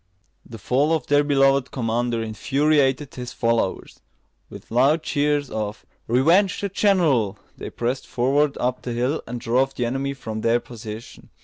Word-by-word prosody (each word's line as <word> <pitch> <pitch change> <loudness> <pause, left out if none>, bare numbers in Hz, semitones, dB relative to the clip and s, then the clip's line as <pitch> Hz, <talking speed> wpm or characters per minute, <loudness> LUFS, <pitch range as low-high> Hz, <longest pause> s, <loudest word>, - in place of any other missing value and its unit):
The 115 - -10
fall 135 +8 +1
of 160 - -1
their 145 0 +3
beloved 135 -2 +3
commander 120 -1 -1
infuriated 135 +4 +1
his 125 -1 -7
followers. 115 -5 -1 0.5
With - - -12
loud 140 +7 +3
cheers 145 -2 0
of 105 -1 -4 0.2
"Revenge 165 - +3
the 200 - -2
general!" 160 - +2 0.2
they - - -7
pressed 125 +3 -3
forward 140 +4 +1
up 125 +1 -1
the 120 - -4
hill, 125 +6 -1
and 120 +1 -5
drove 130 +4 0
the 125 - -1
enemy 135 +3 -2
from 110 -4 -6
their 115 +2 +2
position. 115 -1 -10
130 Hz, 150 wpm, -23 LUFS, 115-145 Hz, 0.5 s, their